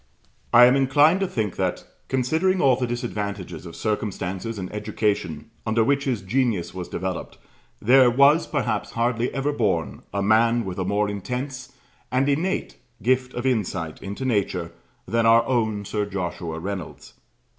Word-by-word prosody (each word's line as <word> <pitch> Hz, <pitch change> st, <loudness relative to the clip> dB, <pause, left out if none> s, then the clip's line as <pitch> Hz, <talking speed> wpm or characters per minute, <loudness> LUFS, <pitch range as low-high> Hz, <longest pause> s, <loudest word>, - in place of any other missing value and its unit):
I 120 Hz, +1 st, +9 dB
am 125 Hz, +2 st, +5 dB
inclined 145 Hz, +6 st, +4 dB
to 195 Hz, -, 0 dB
think 110 Hz, -, -3 dB
that, -, -, -1 dB, 0.2 s
considering 160 Hz, +9 st, +1 dB
all 135 Hz, -5 st, +5 dB
the 125 Hz, 0 st, -2 dB
disadvantages 100 Hz, -, -4 dB
of 85 Hz, -, -10 dB
circumstances 105 Hz, 0 st, -3 dB
and 95 Hz, 0 st, -6 dB
education 105 Hz, -5 st, -2 dB
under 110 Hz, +1 st, +2 dB
which 140 Hz, +3 st, +1 dB
his 125 Hz, -8 st, -1 dB
genius 110 Hz, -3 st, 0 dB
was 90 Hz, -1 st, -6 dB
developed, 95 Hz, 0 st, -4 dB, 0.4 s
there 125 Hz, +3 st, +6 dB
was 140 Hz, +6 st, +4 dB
perhaps 120 Hz, -8 st, -2 dB
hardly 115 Hz, +1 st, 0 dB
ever 140 Hz, +2 st, -1 dB
born 85 Hz, -, -1 dB
a 100 Hz, 0 st, -1 dB
man 115 Hz, +3 st, +3 dB
with 95 Hz, 0 st, -5 dB
a 95 Hz, -, -1 dB
more 100 Hz, +2 st, +1 dB
intense 125 Hz, +6 st, -5 dB, 0.4 s
and 130 Hz, +2 st, +2 dB
innate 160 Hz, +7 st, -1 dB, 0.3 s
gift 130 Hz, +1 st, +1 dB
of 120 Hz, -, -4 dB
insight 95 Hz, -10 st, -1 dB
into 100 Hz, +7 st, -5 dB
nature 95 Hz, -7 st, -1 dB, 0.4 s
than 115 Hz, 0 st, +2 dB
our 115 Hz, +1 st, +6 dB
own 110 Hz, -5 st, 0 dB
Sir 105 Hz, 0 st, -2 dB
Joshua 90 Hz, -4 st, -4 dB
Reynolds. 95 Hz, -1 st, -6 dB
115 Hz, 155 wpm, -24 LUFS, 100-130 Hz, 0.4 s, I